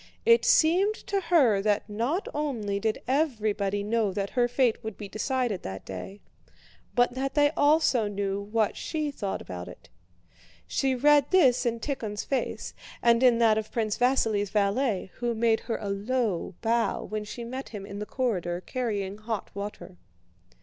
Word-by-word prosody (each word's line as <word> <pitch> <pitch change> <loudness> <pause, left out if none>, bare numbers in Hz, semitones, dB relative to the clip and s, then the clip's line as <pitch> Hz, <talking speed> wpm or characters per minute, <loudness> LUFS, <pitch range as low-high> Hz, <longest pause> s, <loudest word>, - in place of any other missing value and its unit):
It 465 +1 +6
seemed 370 +7 +4
to 395 -2 -2
her 290 - +4
that 210 0 +1
not 235 - -2
only 235 -10 -2
did 220 +1 -2
everybody 215 -8 0
know 215 -1 +1
that 195 +1 -3
her 245 -1 +2
fate 245 -2 +1
would 220 -2 -6
be 205 - -7
decided 240 -1 -1
that 95 0 -7
day, 95 - -8 0.7
but 245 0 +3
that 270 +1 -3
they 290 -1 +4
also 290 -7 +3
knew 200 -1 -2
what 215 +1 0
she 305 -2 -3
thought 200 -8 -4
about 90 -1 -7
it. - - -13 0.8
She 265 -1 0
read 290 +2 +4
this 260 -9 +4
in 230 0 -1
Tíkhon's 225 -6 -3
face 270 - -3 0.3
and 235 0 +5
in 250 -2 +5
that 225 -2 +4
of 215 - -7
Prince 220 -3 -1
Vasíli's 225 -5 +2
valet, 200 0 0
who 240 -1 -1
made 225 0 +2
her 230 - -3
a 205 - -4
low 200 -3 -1
bow 230 0 +1
when 215 0 -4
she 235 +3 -7
met 260 +3 -6
him 205 -3 -7
in 200 0 -7
the 210 - -5
corridor 180 -9 -1
carrying 205 -3 -3
hot 215 -1 -4
water. 200 -2 -7
225 Hz, 165 wpm, -27 LUFS, 205-260 Hz, 0.8 s, It